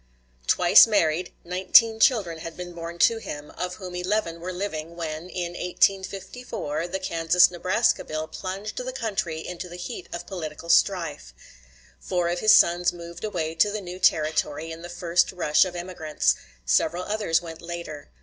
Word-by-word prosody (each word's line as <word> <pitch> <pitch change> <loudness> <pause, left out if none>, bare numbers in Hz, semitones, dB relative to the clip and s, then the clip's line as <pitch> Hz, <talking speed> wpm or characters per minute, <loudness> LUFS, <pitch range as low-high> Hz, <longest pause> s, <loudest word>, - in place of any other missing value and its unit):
Twice 180 +5 +7
married, 180 -5 +1
nineteen 190 +6 +4
children 200 -10 +3
had 165 0 -8
been 180 -1 -7
born 170 0 -7
to 225 +6 +4
him, 150 -8 -8
of 180 0 -4
whom 185 -2 -8
eleven 180 -1 -1
were 180 +2 -5
living 170 -3 -5
when, 165 +1 -5
in 175 -2 -4
1854, 190 -2 -1
the 185 +2 -3
Kansas 175 -1 +3
Nebraska 185 +6 +1
bill 155 0 -4
plunged 195 +5 -6
the 255 0 -3
country 205 -10 -3
into 180 0 -6
the 175 - -9
heat 175 0 -7
of 175 0 -6
political 165 -3 -7
strife. 165 - +1 0.6
Four 175 - -1
of 175 0 -1
his 215 - +5
sons 175 +1 +4
moved 170 -1 -10
away 170 -7 -2
to 205 +5 +3
the 215 +1 -3
new 180 -1 -8
Territory 155 -2 +1
in 160 +1 -8
the 175 - -8
first 175 0 +1
rush 170 -3 +3
of 180 -1 -6
emigrants; 170 - 0 0.3
several 155 - +1
others 205 -6 0
went 165 -1 -9
later. 170 - -7
175 Hz, 165 wpm, -25 LUFS, 165-185 Hz, 0.6 s, Twice